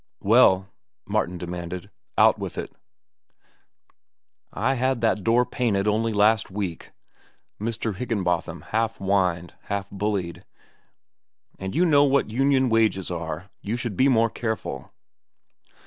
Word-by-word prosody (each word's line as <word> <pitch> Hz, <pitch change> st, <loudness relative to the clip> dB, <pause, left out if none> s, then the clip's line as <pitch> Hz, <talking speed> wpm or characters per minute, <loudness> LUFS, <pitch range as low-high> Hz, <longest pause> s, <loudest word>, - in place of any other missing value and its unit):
"Well," 100 Hz, -3 st, +5 dB, 0.4 s
Martin 90 Hz, +1 st, -1 dB
demanded. 90 Hz, +2 st, -6 dB, 0.3 s
"Out 110 Hz, 0 st, +5 dB
with 95 Hz, -3 st, -6 dB
it." -, -, -5 dB, 1.8 s
"I 135 Hz, -, 0 dB
had 130 Hz, -1 st, 0 dB
that 110 Hz, -3 st, +1 dB
door 120 Hz, +2 st, +3 dB
painted 105 Hz, -6 st, 0 dB
only 110 Hz, +2 st, +1 dB
last 110 Hz, +1 st, +3 dB
week," 95 Hz, -4 st, -5 dB, 0.7 s
Mr. 110 Hz, -1 st, -2 dB
Higginbotham 90 Hz, -8 st, -2 dB
half 115 Hz, +1 st, 0 dB
whined, 95 Hz, -3 st, 0 dB
half 100 Hz, -1 st, -3 dB
bullied; 100 Hz, -4 st, -3 dB, 1.2 s
"and 95 Hz, 0 st, -5 dB
you 180 Hz, -, +4 dB
know 145 Hz, -4 st, +5 dB
what 140 Hz, -5 st, +2 dB
union 135 Hz, +2 st, +2 dB
wages 110 Hz, -5 st, +1 dB
are. 85 Hz, +2 st, -5 dB
You 105 Hz, +3 st, -3 dB
should 120 Hz, -4 st, -4 dB
be 130 Hz, -, +4 dB
more 115 Hz, -4 st, +3 dB
careful." 110 Hz, -, -4 dB
105 Hz, 120 wpm, -24 LUFS, 95-115 Hz, 1.8 s, Well